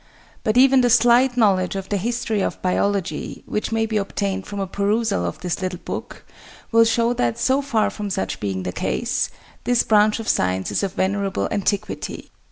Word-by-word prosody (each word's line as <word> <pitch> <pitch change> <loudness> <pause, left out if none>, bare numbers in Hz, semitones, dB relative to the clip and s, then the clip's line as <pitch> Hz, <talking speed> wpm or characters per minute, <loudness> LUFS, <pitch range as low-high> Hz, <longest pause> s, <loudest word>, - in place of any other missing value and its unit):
But 215 0 +1
even 265 0 +6
the 245 - +3
slight 245 +2 +4
knowledge 195 -5 +2
of 195 -1 -5
the 205 - 0
history 225 0 -1
of - - -2
Biology, 185 -3 -1
which 210 - -3
may 225 0 +1
be 220 -1 -1
obtained 195 -1 -2
from 205 -1 -5
a 195 - -1
perusal 200 +3 0
of - - -4
this 180 0 -3
little 185 -1 -3
book, - - -7 0.5
will 230 0 +6
show 235 +1 +2
that, 120 - 0
so 265 +2 +2
far 235 -6 0
from 205 -1 -5
such 95 - -3
being 95 -3 -3
the 90 - -3
case, - - -1 0.3
this 245 -1 +2
branch 215 0 +3
of 225 - -6
science 95 0 0
is - - 0
of 195 -2 -2
venerable 195 0 -1
antiquity. 200 0 -3
205 Hz, 185 wpm, -22 LUFS, 190-230 Hz, 0.5 s, even